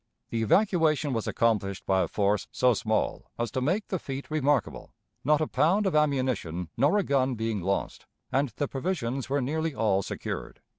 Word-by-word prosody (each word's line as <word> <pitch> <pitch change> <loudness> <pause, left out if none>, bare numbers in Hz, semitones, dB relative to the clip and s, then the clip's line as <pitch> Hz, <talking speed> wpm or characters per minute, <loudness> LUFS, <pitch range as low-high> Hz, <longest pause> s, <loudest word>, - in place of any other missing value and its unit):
The 115 - -1
evacuation 155 - +2
was 115 -2 -2
accomplished 105 -4 0
by 95 -1 +2
a 85 - 0
force 100 0 0
so 125 -1 +3
small 110 0 -1
as 120 0 -2
to 130 - -2
make 185 +11 0
the 185 - -1
feat 135 +1 -6
remarkable, 145 -6 0 0.3
not 150 +2 +3
a 155 - +1
pound 200 +6 +2
of 190 - +1
ammunition 130 - 0
nor 150 +9 +3
a 205 - +2
gun 135 -4 +1
being 110 -3 -2
lost, 95 +3 -2 0.2
and 135 +1 +1
the 145 - -1
provisions 135 -4 -3
were 140 +1 +1
nearly 160 +3 -1
all 100 -3 +2
secured. - - -5
130 Hz, 180 wpm, -28 LUFS, 110-150 Hz, 0.3 s, so